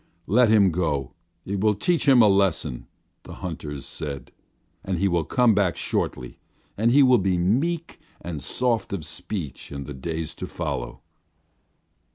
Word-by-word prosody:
"Let 115 +5 +4
him 100 -4 +5
go; 75 -6 -1 0.3
it 100 0 -3
will 105 0 +3
teach 165 - 0
him 130 -4 +7
a - - +6
lesson," 95 -9 +1 0.3
the - - -11
hunters 75 -5 -6
said. 70 -4 -7 0.5
"And 95 -2 -2
he 100 - +2
will 85 -3 +1
come 125 +4 +3
back 95 -4 +1
shortly, 65 -1 -2 0.4
and 110 +3 +2
he 140 +4 +6
will 130 -2 +5
be 95 -1 +1
meek 150 - 0 0.2
and 80 -4 -6
soft 115 - 0
of 85 -6 -4
speech 90 -10 -6
in 70 0 -5
the 75 - -7
days 80 +4 -4
to - - -3
follow." - - -4
95 Hz, 160 wpm, -24 LUFS, 80-110 Hz, 0.5 s, him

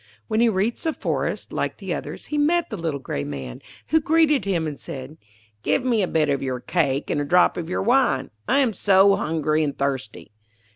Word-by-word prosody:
When 220 -1 0
he 235 0 +5
reached 210 +3 -1
the 320 - +1
forest, - - -3
like - - -2
the - - -4
others, - - -6
he - - +1
met 330 +1 +2
the - - -2
little 165 -6 -3
grey 70 - -4
Man, 70 -4 -6 0.3
who 320 0 +3
greeted 305 -4 +3
him, 175 -5 0
and 150 -2 -5
said, 140 +4 -8 0.4
'Give 255 - 0
me 235 -4 +2
a 185 - +1
bit 155 -3 +1
of 140 -1 0
your 130 -2 -2
cake 140 -1 -1
and 145 - 0
a - - 0
drop 175 +5 +4
of 170 -1 -5
your 180 - -1
wine. 240 - +2 0.2
I 280 - +3
am 245 -5 +1
so 195 +1 +5
hungry 155 -1 0
and 140 -2 -3
thirsty.' 125 -11 -3
170 Hz, 210 wpm, -23 LUFS, 140-230 Hz, 0.4 s, he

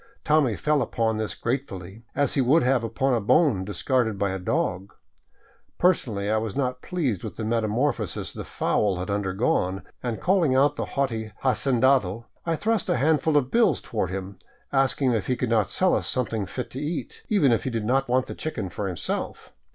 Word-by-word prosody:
Tommy 150 -7 +3
fell 150 +4 +1
upon 115 -2 0
this 110 -1 -3
gratefully, 110 -6 -4
as 145 -1 +2
he 140 - +2
would 145 +6 +4
have 125 -1 +2
upon 130 +4 0
a 115 - +1
bone 110 - +3
dis 100 -2 -5
carded 120 -6 +1
by 100 -1 0
a 95 - -3
dog. 95 - -1 0.9
Personally 115 - +1
I 110 +1 +2
was 110 -2 -3
not 125 -2 -1
pleased 140 - -2
with - - -6
the 110 - -5
metamorpho 115 +1 0
sis - - -4
the - - -6
fowl 100 -3 0
had 90 +3 -3
undergone, 95 -1 0 0.2
and 120 -3 -3
calling 175 -8 +2
out 145 +2 +4
the - - -2
haughty 115 -6 -1
hacendado, 130 -5 +2 0.2
I 165 - +2
thrust 220 +3 0
a - - +2
handful 150 +2 +2
of 130 -3 0
bills 225 -9 +3
toward 105 -6 -3
him, 95 +1 -6 0.3
asking 135 -1 +2
if 110 -4 -1
he 125 - +1
could 125 -1 -2
not 110 -4 +2
sell 185 0 +2
us - - 0
something 115 -6 -1
fit 125 - -5
to 130 - -5
eat, 150 +2 -4
even 185 - +4
if 115 - +2
he - - 0
did 115 -3 -3
want 130 0 +2
the - - -7
chicken 110 - -4
for 100 +3 -3
himself. 90 -3 -4
125 Hz, 195 wpm, -25 LUFS, 105-140 Hz, 0.9 s, would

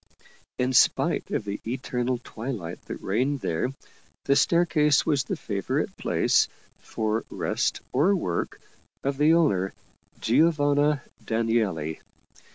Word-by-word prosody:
In 125 +1 0
spite 125 - +3
of - - -2
the 100 0 -4
eternal 125 0 -2
twilight 110 -8 -6
that - - -7
reigned 130 +8 0
there, 85 +9 -1 0.6
the 140 - +3
staircase 150 -1 +3
was 145 -4 +2
the 195 - -2
favorite 100 - -2
place, - - +2 0.3
for 110 0 -2
rest - - -1
or 165 +10 +4
work, 90 - -2 0.4
of 140 0 -2
the 155 +2 +5
owner, 95 - +2 0.4
Giovanna 145 +1 +3 0.2
Danieli. 110 -9 0
130 Hz, 115 wpm, -26 LUFS, 110-145 Hz, 0.6 s, the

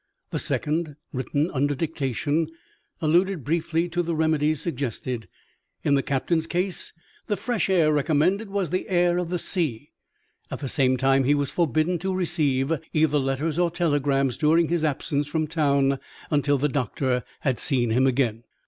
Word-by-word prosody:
The - - -1
second, 155 0 -1 0.2
written 145 +5 -1
under 145 +1 +1
dictation, 150 +1 -1 0.6
alluded 175 +1 +2
briefly 165 +3 0
to 175 +1 0
the 170 -1 -2
remedies 155 -1 +1
suggested. 125 - -3 0.6
In 145 - +2
the 140 - +4
captain's 160 +5 0
case, 180 +2 -2 0.4
the 205 - 0
fresh 235 -7 -1
air 165 -5 +4
recommended 160 +8 +1
was 195 -4 -2
the 185 - -2
air 175 -1 +3
of 175 -2 -3
the 180 - -1
sea. 155 - -2 0.6
At - - -4
the 140 - -5
same 130 -1 +2
time 135 +1 +3
he 145 +3 +4
was 145 -1 -1
forbidden 165 +2 +1
to 190 +2 -2
receive 155 -6 +1 0.2
either 155 -2 +3
letters 140 +4 -1
or 175 -1 +3
telegrams, 145 -6 +1
during 160 +2 +3
his 170 -2 0
absence 145 -1 -1
from 155 +1 -1
town, 140 -3 +1 0.3
until 145 -1 +2
the 145 +3 +1
doctor 130 -1 -1 0.2
had 130 -5 0
seen 120 -4 +1
him 130 +4 +3
again. 120 -4 0
150 Hz, 160 wpm, -25 LUFS, 135-170 Hz, 0.6 s, the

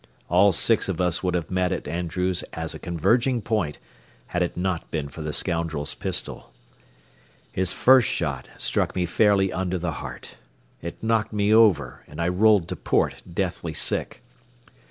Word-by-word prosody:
All 95 +4 +5
six 105 +4 +2
of 90 - -2
us 90 -2 +1
would 90 -1 0
have 85 -1 -3
met 90 0 +1
at 95 - -3
Andrews 90 +2 -1
as 80 -1 -3
a - - -8
converging 120 - +1
point, 105 -9 -1 0.5
had 90 - -2
it 90 - -1
not 90 -2 -2
been 75 -3 -3
for 80 - -9
the 75 0 -3
scoundrel's 80 -3 -1
pistol. - - -3 1.0
His 95 -1 0
first 130 -2 +5
shot 70 -6 -2
struck - - -1
me 90 -1 +1
fairly 95 0 +3
under 95 +1 -1
the 85 -1 -2
heart. - - -9 0.4
It 85 +5 -7
knocked 110 -1 +1
me 105 0 +2
over, 90 - +4
and 75 - -11
I 85 +1 +1
rolled 100 -1 +4
to - - -3
port, - - 0
deathly - - -3
sick. - - -2
90 Hz, 165 wpm, -24 LUFS, 85-100 Hz, 1.0 s, All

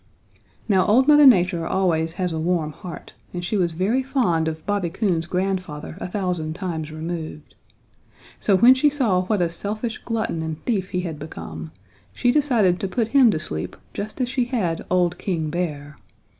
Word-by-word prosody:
"Now 190 -4 +4
old 255 +6 +4
Mother 295 -1 +8
Nature 180 -7 +4
always 165 -4 +1
has 180 -2 -2
a 160 - -2
warm 165 -2 0
heart 170 +2 -10 0.2
and 175 0 -3
she 215 - -2
was 175 -4 +1
very 200 +10 +1
fond 220 - +1
of 160 0 -4
Bobby 200 -4 0
Coon's 170 -3 -1
grandfather 180 -5 -3
a - - -3
thousand 180 -5 -2
times 165 -5 -4
removed. 155 -1 -6 0.9
So 200 - +3
when 240 +7 +8
she 260 +3 +3
saw 240 -11 +1
what 200 -2 +1
a - - +2
selfish 215 +6 -4
glutton 220 -8 -2
and 160 -1 -4
thief 195 -6 -1
he 180 - -1
had 165 -4 -5
become 80 - -7 0.4
she 245 - +2
decided 240 -11 +2
to 195 - -2
put 225 +4 -1
him 265 -3 +6
to 170 - +1
sleep 80 - -3 0.2
just 210 +4 -5
as 255 - +1
she 250 -1 0
had 195 -10 -1
old 180 -1 +1
King 160 -5 -2
Bear. 150 -4 -4
180 Hz, 180 wpm, -23 LUFS, 160-215 Hz, 0.9 s, Mother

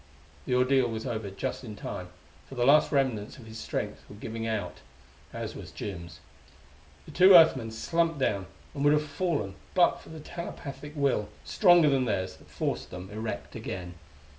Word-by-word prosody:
The 125 - +2
ordeal 130 0 +4
was 110 -1 -4
over 110 -3 -3
just 125 +8 -4
in 110 -4 -7
time, 90 -2 -6 0.4
for 135 - -9
the 120 -1 +1
last 145 +3 +6
remnants 130 -7 0
of 120 - -12
his 110 0 -9
strength - - -4
was 105 - -11
giving 115 +1 -5
out 105 -5 -3 0.5
as - - -5
was - - -8
Jim's. 85 -4 -7 0.8
The - - -11
two 185 +1 +8
Earth 165 -1 +9
men 115 -4 -5
slumped 165 +8 0
down, 100 -8 0 0.3
and 140 -2 -3
would 145 0 +6
have 150 0 +2
fallen 145 - -1 0.2
but 180 -2 +4
for - - -15
the 160 0 -8
telepathic 150 -3 -7
will, 135 -8 +1
stronger 175 -5 +5
than 135 -2 +2
theirs, 95 -4 -2
that - - -20
forced - - -3
them 90 +2 -8
erect 110 +1 -5
again. 90 -1 -5
125 Hz, 180 wpm, -28 LUFS, 105-150 Hz, 0.8 s, Earth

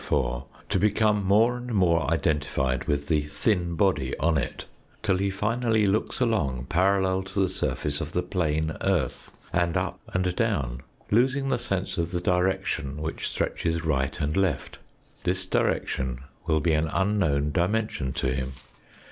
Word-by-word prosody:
4, 65 -2 0 0.2
to 95 - +2
become 105 +1 +3
more 110 +6 +4
and 125 -1 -4
more 85 -4 +3
identified 75 -5 0
with 70 -1 -1
the 75 -3 +2
thin 85 +4 0
body 80 -8 +1
on 85 0 +2
it, 70 -5 -2 0.4
till 95 - +2
he 100 +1 +1
finally 110 +2 +1
looks 100 +2 0
along 75 - 0
parallel 95 +1 +2
to 95 +1 -4
the 95 - +4
surface 75 -4 -2
of - - -4
the 90 - +1
plane 80 -3 0
earth, 90 -10 0 0.2
and 85 -1 +2
up - - -2
and 90 -1 0
down, 70 - 0 0.3
losing 135 +5 +3
the - - +2
sense 95 -5 -2
of 85 0 0
the 90 0 -2
direction 90 -5 0
which 80 +1 -3
stretches 85 -1 -1
right 70 -2 0
and 75 +1 -1
left. 95 -8 0 0.4
This 95 +1 0
direction 65 -7 0 0.3
will 80 -2 +2
be 80 0 +2
an 80 +1 +2
unknown 85 -5 +1
dimension 90 -5 0
to 65 -1 0
him. 65 0 -3
85 Hz, 155 wpm, -26 LUFS, 75-100 Hz, 0.4 s, more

